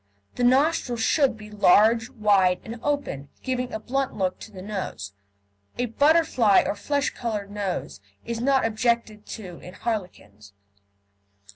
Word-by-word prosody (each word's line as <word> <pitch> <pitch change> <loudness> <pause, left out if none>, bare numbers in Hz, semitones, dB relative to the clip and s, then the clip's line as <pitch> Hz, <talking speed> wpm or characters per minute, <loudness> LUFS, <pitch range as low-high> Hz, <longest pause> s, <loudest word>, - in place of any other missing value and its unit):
The 245 - -2
nostrils 260 -2 +2
should 265 +1 +2
be 210 0 -12
large, 220 +3 +4
wide, 200 -7 +3
and 230 +1 -8
open, 280 - -2
giving 255 -1 -2
a 220 - -4
blunt 270 +4 -2
look 185 -2 -1
to 220 - -11
the 185 -3 -10
nose. 190 - -5 0.6
A 245 - 0
butterfly 270 - +4
or - - 0
flesh 280 +7 -1
coloured 210 -4 -4
nose 200 - -4 0.3
is 235 -1 -4
not 270 0 +3
objected 225 -1 -1
to 185 -6 -8
in 180 +1 -11
harlequins. 175 - -5
220 Hz, 140 wpm, -25 LUFS, 200-250 Hz, 0.6 s, large